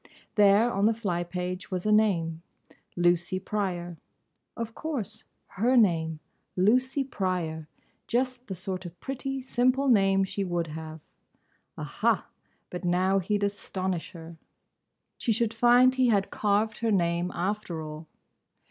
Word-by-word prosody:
There, 210 +3 +5
on 195 +1 +2
the 225 +1 +3
fly 180 -6 -1
page, 180 +1 -5
was 185 0 -3
a 215 - +2
name.—"Lucy 175 -2 0
Pryor"—Of 190 +3 -6
course! 230 -9 -5 0.2
Her 240 +6 +1
name! 165 -7 +2 0.4
Lucy 255 +8 +2
Pryor—just 195 - -3
the 190 - -4
sort 185 0 -5
of 175 0 -13
pretty, 270 +2 -4
simple 255 +2 +2
name 195 -4 +4
she 195 +1 -2
would 175 -2 -1
have. 160 0 -7 0.8
Aha! - - 0 0.5
but 180 +1 -5
now 185 +2 +2
he'd 205 +2 -1
astonish 190 -3 -3
her! 165 -1 -10 0.8
She 235 - 0
should 225 0 +1
find 245 +2 +5
he 260 -1 +3
had 200 -4 +2
carved 210 +1 0
her 230 -1 0
name, 170 -2 +1
after 180 -3 -2
all! 155 +1 -8
195 Hz, 125 wpm, -28 LUFS, 175-230 Hz, 0.8 s, There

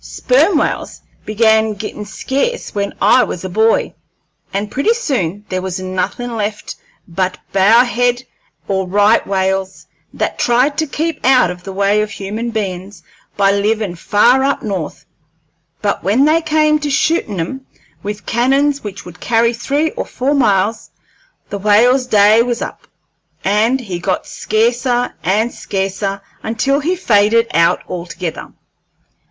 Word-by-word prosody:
Sperm 410 -8 +2
whales - - -2 0.2
began 220 0 +2
gittin' 210 0 -6
scarce 280 - -3
when 200 -1 -2
I 220 +5 +5
was 185 -3 -5
a - - -4
boy, 220 +4 +2 0.6
and 205 +1 -3
pretty 430 - +1
soon 205 - -2
there 185 -1 -2
was 185 0 -4
nothin' 185 +6 -3
left 210 -1 -4 0.3
but 185 +1 -2 0.2
bow 210 +5 +5
head 245 0 0 0.4
or 190 -2 -1
right 205 +4 +4
whales, 190 0 -1 0.3
that - - -3
tried 250 +4 +2
to 315 - 0
keep 315 +2 -3
out 250 -8 +4
of 180 0 -9
the 195 - -8
way 200 +2 +2
of 215 - -2
human 205 +4 -5
bein's 195 -4 -5 0.3
by 195 -1 +4
livin' 205 -1 0
far 235 +9 +3
up 280 +1 0
North; 190 -8 -4 0.8
but 200 - -1
when 215 +10 +3
they 315 +2 +3
came 305 -1 +2
to 295 -1 -3
shootin' 280 - 0
'em 265 +11 -5 0.3
with 210 +1 -6
cannons 275 +4 +1
which 205 -2 -7
would 175 -1 -12
carry 230 0 +2
three 285 +6 -1
or - - -4
four 270 +3 -1
miles, 215 -5 +1 0.6
the 200 - -3
whale's 240 +6 +3
day 215 0 +5
was 240 0 -1
up, - - -9 0.6
and 220 +7 +2
he 190 -7 -5
got 185 +1 -2
scarcer 240 +2 0
and 215 +7 +1
scarcer, 195 0 -3 0.2
until 270 +5 0
he 335 +6 0
faded 230 - +3
out 170 0 +3
altogether. 170 -1 -6
215 Hz, 145 wpm, -16 LUFS, 195-250 Hz, 0.8 s, I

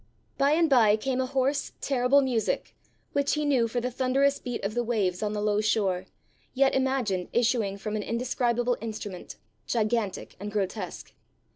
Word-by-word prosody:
By 280 +2 +3
and 330 +1 +4
by 230 -7 +5
came 260 +3 -1
a 260 - -1
hoarse, 270 +1 0
terrible 270 +1 +3
music, 240 -4 -1 0.4
which 280 +1 +1
he 300 0 -1
knew 260 -5 +3
for 245 +2 -2
the 250 +1 -2
thunderous 270 +3 +2
beat 245 -1 -5
of 200 +2 -2
the 240 +1 0
waves 205 -7 0
on 210 -1 -1
the 210 - -2
low 210 0 +2
shore, 190 -4 0 0.5
yet 270 +1 +4
imagined 255 -9 0
issuing 230 -4 +1
from 210 +1 -4
an 215 - -1
indescribable 240 +1 0
instrument, 210 -5 -6 0.3
gigantic 220 -3 -1
and 205 +2 -5
grotesque. 200 -2 -4
235 Hz, 165 wpm, -27 LUFS, 210-260 Hz, 0.5 s, by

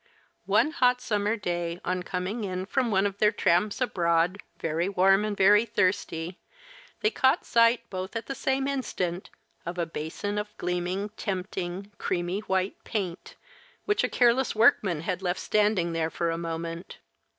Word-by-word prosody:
One 305 - +3
hot 250 -6 +3
summer 210 -2 0
day, 175 -4 -3
on 180 0 -1
coming 185 +5 -3
in 185 -1 -3
from 250 +4 0
one 195 -2 +2
of 200 0 -2
their 210 0 +5
tramps 205 -1 +1
abroad, 175 -4 +1 0.2
very 165 +3 -1
warm 195 +1 +4
and 210 -1 -2
very 205 +3 +6
thirsty, 185 -5 -1 0.6
they 430 - +2
caught 265 0 +2
sight, 235 0 +3
both 185 +3 -5
at 230 - -3
the 275 - -4
same 270 0 0
instant, 190 -10 -3 0.3
of 175 +2 -5
a 170 - 0
basin 165 +6 -4
of 210 0 -7
gleaming, 180 +3 -2
tempting, 190 0 -4
creamy 175 +2 -1
white 190 -2 -2
paint, 185 -6 -4 0.5
which 415 -1 +1
a - - +1
careless 245 +1 +3
workman 205 -7 +4
had 180 +2 -3
left 180 0 -1
standing 205 -5 +1
there 165 -1 0
for 170 0 -1
a - - -1
moment. 165 +1 -5
190 Hz, 160 wpm, -27 LUFS, 175-215 Hz, 0.6 s, very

